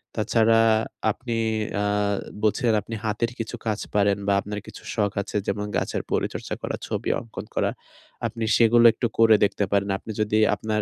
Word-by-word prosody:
তাছাড়া 115 +1 +3 0.5
আপনি 120 +1 -4 0.4
আ - - 0 0.6
বলছেন 115 +2 +2
আপনি 115 +3 -7
হাতের 115 +2 -1
কিছু 115 - -4
কাজ 110 -2 -1 0.2
পারেন 100 0 +3
বা 100 - +4
আপনার 105 +1 -5
কিছু - - -11
শখ 105 -3 +1
আছে 105 - -4
যেমন 105 +1 -1
গাছের - - -2
পরিচর্চা - - -2
করা, - - -3
ছবি - - -2
অঙ্কন 110 -4 -8
করা, - - +1 0.6
আপনি 115 0 -5
সেগুলো 120 0 +5
একটু 120 - -1
করে 110 -1 +7
দেখতে 100 - +1
পারেন। 100 0 +1
আপনি 110 - -8
যদি 105 0 +1 0.2
আপনার 110 -1 -2
110 Hz, 165 wpm, -24 LUFS, 105-115 Hz, 0.6 s, করে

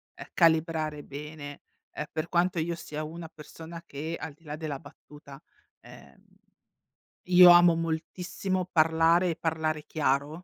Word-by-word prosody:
ehm, - - -10
calibrare 160 -3 +1
bene, 145 0 -9 0.3
ehm, 150 - -5
per 160 +1 -3
quanto 175 0 +1
io 170 +1 -2
sia 155 -2 -6
una 165 +1 -8
persona 165 +2 -11
che 160 +3 -5
al 155 -1 -7
di 160 +3 -28
là 150 -1 -6
della 150 -4 -5
battuta, 145 -1 -15 0.4
ehm, - - -16 1.0
io 180 0 +8
amo 175 -1 +7
moltissimo 175 +3 -3
parlare 165 +2 +3
e - - -4
parlare 155 -2 -2
chiaro. 140 -2 0
160 Hz, 140 wpm, -28 LUFS, 150-170 Hz, 1.0 s, io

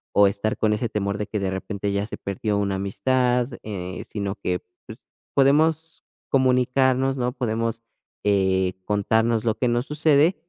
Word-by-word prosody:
o 100 0 +7
estar 105 +2 -1
con 110 -1 +2
ese 110 +2 -1
temor 100 -2 -2
de 105 - -2
que 105 - -3
de 95 -1 -1
repente 100 +1 -3
ya 100 +1 -1
se 115 - -7
perdió 100 +1 -2
una 100 -1 0
amistad, 125 +5 +1 0.2
eh, 95 -3 -5
sino 100 -2 -3
que, 90 -3 -2 0.3
pues, - - -12 0.3
podemos 155 +3 +2 0.3
comunicarnos, 130 0 +2
¿no?, 125 -1 0
podemos, 115 -2 -2 0.4
eh, 95 -2 +2
contarnos 110 +2 +1
lo 110 -2 +1
que 125 - +1
nos 120 +1 0
sucede, 150 +3 +3
110 Hz, 160 wpm, -24 LUFS, 100-130 Hz, 0.4 s, o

